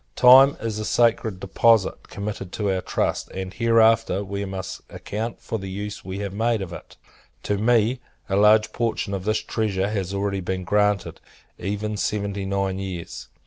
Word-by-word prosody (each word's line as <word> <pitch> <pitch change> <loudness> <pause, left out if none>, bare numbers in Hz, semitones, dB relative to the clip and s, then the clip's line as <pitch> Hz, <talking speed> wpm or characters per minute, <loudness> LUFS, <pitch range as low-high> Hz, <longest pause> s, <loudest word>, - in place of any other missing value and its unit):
Time 130 +3 +7
is 110 -2 -3
a - - -3
sacred 115 -3 +1
deposit 105 +2 +2
committed 100 -2 -5
to 105 -2 -1
our 95 -1 -1
trust; - - -2
and, 95 0 -5
hereafter, 115 -3 +3
we 100 +1 -4
must 95 -1 -6
account 110 +3 -5
for 110 - -4
the 95 0 -6
use 105 +2 -6
we 95 +1 -6
have 100 -1 -4
made 115 +2 +1
of 95 -3 -6
it. - - -11 0.5
To 100 -1 -1
me, 120 +2 +2 0.3
a 95 - -1
large 105 +1 +4
portion 115 -3 -2
of 95 -1 -4
this 110 0 0
treasure 100 -3 -1
has 95 -3 -2
already 100 0 -1
been 95 +1 -3
granted, 105 0 0 0.4
even 105 +3 -3
seventy 100 -2 -2
nine 95 -1 -1
years. 95 -3 -6
100 Hz, 170 wpm, -23 LUFS, 95-110 Hz, 0.5 s, Time